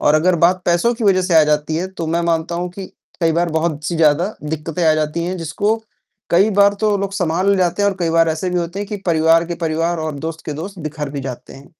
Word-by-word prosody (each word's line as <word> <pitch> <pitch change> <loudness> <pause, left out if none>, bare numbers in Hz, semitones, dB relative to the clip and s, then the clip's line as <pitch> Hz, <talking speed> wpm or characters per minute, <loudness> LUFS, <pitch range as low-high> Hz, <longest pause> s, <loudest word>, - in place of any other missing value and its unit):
और 150 - +3
अगर 175 +3 +3
बात 180 +1 +3
पैसों 175 +8 +2
की 230 -1 -4
वजह 185 -2 +4
से 180 -2 0
आ - - +5
जाती 150 +1 0
है, 180 - -1
तो 170 -4 -6
मैं 170 +2 0
मानता 170 0 -1
हूँ 175 +1 -3
कि 190 +1 -8 0.3
कई 165 -1 +2
बार 170 +1 +1
बहुत-सी 160 0 -1
ज़्यादा 165 +6 +2
दिक्कतें 160 +2 -3
आ 155 - +5
जाती 155 +2 -1
हैं, 185 +1 -3
जिसको 200 +7 0 0.5
कई 190 +5 +4
बार 200 0 +5
तो 210 -2 +2
लोग 195 0 -3
सँभाल 180 +1 0
ले 200 - +3
जाते 185 +2 +1
हैं 200 - +4
और 195 - -7
कई 165 -2 +1
बार 165 0 +3
ऐसे 160 +4 -2
भी 180 - 0
होते 175 +3 -4
हैं 205 - -5
कि 210 - -3
परिवार 165 0 +4
के 170 - -3
परिवार 165 +2 0
और 155 -1 -3
दोस्त 165 0 -6
के 150 - -3
दोस्त 195 0 -8
बिखर 150 -2 -5
भी 140 -1 -5
जाते 130 -2 -7
हैं। 135 - -14
170 Hz, 260 wpm, -18 LUFS, 160-185 Hz, 0.5 s, आ